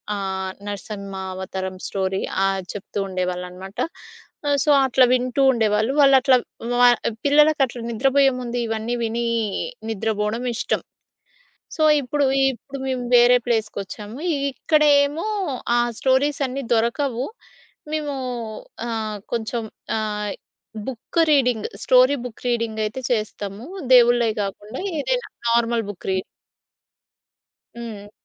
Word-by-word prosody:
ఆహ్, 190 -1 -3
నరసింహ 200 -1 -6 0.2
అవతారం 190 0 -4
స్టోరీ 190 0 -1 0.2
ఆహ్, 195 0 0
చెప్తూ 205 0 -5
ఉండేవాళ్ళున్నమాట. 180 +1 -4 0.8
సో - - 0 0.2
అట్లా 255 0 +5
వింటూ 255 +2 +1
ఉండేవాళ్ళు. 220 +1 +1
వాళ్ళట్లా 270 -1 +6 0.4
వ - - +7 0.4
పిల్లలకి 295 +1 +5
అట్లా 245 -2 -8
నిద్రబోయే 270 +4 +3
ముందు 245 0 -4
ఇవన్నీ 225 +2 -2
విని 230 +1 -1 0.6
నిద్రబోవడం 220 +2 -1
ఇష్టం. - - -1 0.9
సో 315 - -3 0.2
ఇప్పుడు, 280 +2 0 0.3
ఇప్పుడు 275 +2 -9
మేము 255 -1 -1
వేరే 245 +1 +7
ప్లేస్‌కొచ్చాము. 215 -2 -3 0.4
ఇక్కడేమో 295 +2 +3 0.5
ఆ - - +4 0.2
స్టోరీస్ 270 +2 +2
అన్నీ 270 +2 -4
దొరకవు. 235 +2 0 0.7
మేము 295 -2 -2 0.7
ఆహ్, 220 -2 -3 0.2
కొంచెం 230 0 -2 0.4
ఆహ్, 210 -1 -2 0.6
book 260 +6 -3
reading, 250 -6 +2 0.2
story 255 +2 +5
book 245 -1 -9
reading 230 -2 -1
అయితే 220 +5 -4
చేస్తాము. 210 -1 -3 0.3
దేవుళ్ళయి 240 -2 +5
గాకుండా 205 +4 -5 0.2
ఏదైనా - - -1 0.2
నార్మల్ 235 -1 +2
బుక్ 190 - -12
రీడింగ్. 185 0 0 1.5
హ్మ్. 210 -3 -8
235 Hz, 105 wpm, -22 LUFS, 210-260 Hz, 1.5 s, వ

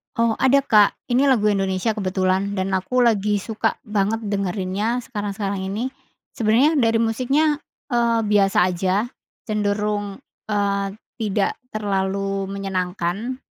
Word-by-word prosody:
Oh 230 -1 +1
ada 275 +1 +4
Kak, 210 -5 +4 0.2
ini 265 +3 +4
lagu 215 -5 +3
Indonesia 195 +2 0
kebetulan 190 -1 0
dan 190 +1 -1
aku 190 +7 +1
lagi 210 -3 +2
suka 220 +2 -1
banget 210 0 -1
dengerinnya 200 +3 -1
sekarang-sekarang 205 -4 -3
ini, 225 +7 -3 0.4
sebenarnya 245 +8 +3
dari 225 -2 +3
musiknya, 275 +7 +1 0.3
eee, 235 -1 +2
biasa 205 -2 +2
aja, 185 +1 0 0.5
cenderung, 205 -1 -1 0.3
eee, 200 -1 0 0.3
tidak 205 -2 0 0.2
terlalu 195 -1 -1
menyenangkan, 195 +3 -3
205 Hz, 115 wpm, -22 LUFS, 195-230 Hz, 0.5 s, ada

